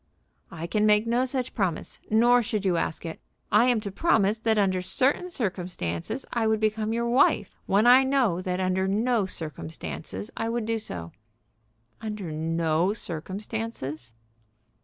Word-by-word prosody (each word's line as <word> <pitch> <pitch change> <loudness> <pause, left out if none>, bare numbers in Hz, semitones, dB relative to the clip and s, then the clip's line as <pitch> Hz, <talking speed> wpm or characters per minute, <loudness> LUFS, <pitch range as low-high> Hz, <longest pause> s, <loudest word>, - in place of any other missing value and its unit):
"I 165 0 -6
can 210 +5 +1
make 210 +1 +4
no 240 +2 +2
such 255 -1 -2
promise, 185 -7 -2
nor 240 +3 +5
should 210 -2 -2
you 185 -2 +2
ask 165 0 -2
it. 165 - -6 0.3
I 215 +4 +6
am 245 -3 +3
to 200 -2 -5
promise 215 - +2
that 220 0 +1
under 190 -3 +2
certain 275 - +1
circumstances 180 - -3
I 230 -2 +1
would 220 0 +2
become 215 0 0
your 235 +1 0
wife, 240 +3 +3
when 205 +3 +3
I 250 +2 +8
know 260 -10 +1
that 185 0 -2
under 185 0 +1
no 215 +1 +1
circumstances 160 - -5
I 225 - -2
would 235 -1 -1
do 225 0 -1
so." 85 - -6 0.9
"Under 210 -6 -5
no 165 +3 0
circumstances?" 185 - -5
210 Hz, 155 wpm, -26 LUFS, 180-230 Hz, 0.9 s, I